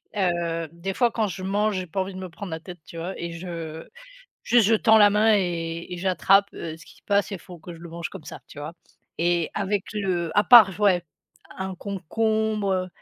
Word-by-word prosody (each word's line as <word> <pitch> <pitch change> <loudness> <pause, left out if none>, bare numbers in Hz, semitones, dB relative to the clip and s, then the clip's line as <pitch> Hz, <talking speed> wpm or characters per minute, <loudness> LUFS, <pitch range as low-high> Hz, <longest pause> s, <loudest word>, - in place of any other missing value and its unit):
heu, 170 -4 -1
des 170 +3 -5
fois 240 +3 +2
quand 220 -2 0
je 185 0 -6
mange, 205 +2 0
j'ai 185 -1 -4
pas 180 +4 -4
envie 190 0 -4
de 185 - -7
me 185 -1 -6
prendre 180 +2 -8
la 160 0 -5
tête, 175 +1 -10
tu 170 - -11
vois 175 +3 -5
et 170 0 -5
je 165 -2 -7 0.6
juste, 240 -3 +4
je 225 - +5
tends 220 0 +5
la 205 -1 +7
main 215 +2 +4
et 170 -2 -3
et - - -5
j'attrape, 195 +2 +3
heu, 160 -1 -6
ce 160 - -15
qui - - -17
se - - -25
passe 200 0 +2
et - - -2
il - - -10
faut 180 -2 -12
que 170 +1 -10
je 165 - -13
le 170 0 -10
mange 170 +1 -5
comme 185 -6 -11
ça, - - -9
tu 145 - -11
vois? 150 +3 -6 0.4
Et 170 -1 +1
avec 200 -1 -1
le 185 -4 -2
à 205 - +6
part, 225 -5 +9
j 210 - -10
ouais, 180 -4 +3 0.5
un 190 0 -4
concombre, 215 +2 -1
heu, 185 0 -1
185 Hz, 240 wpm, -24 LUFS, 170-205 Hz, 0.6 s, part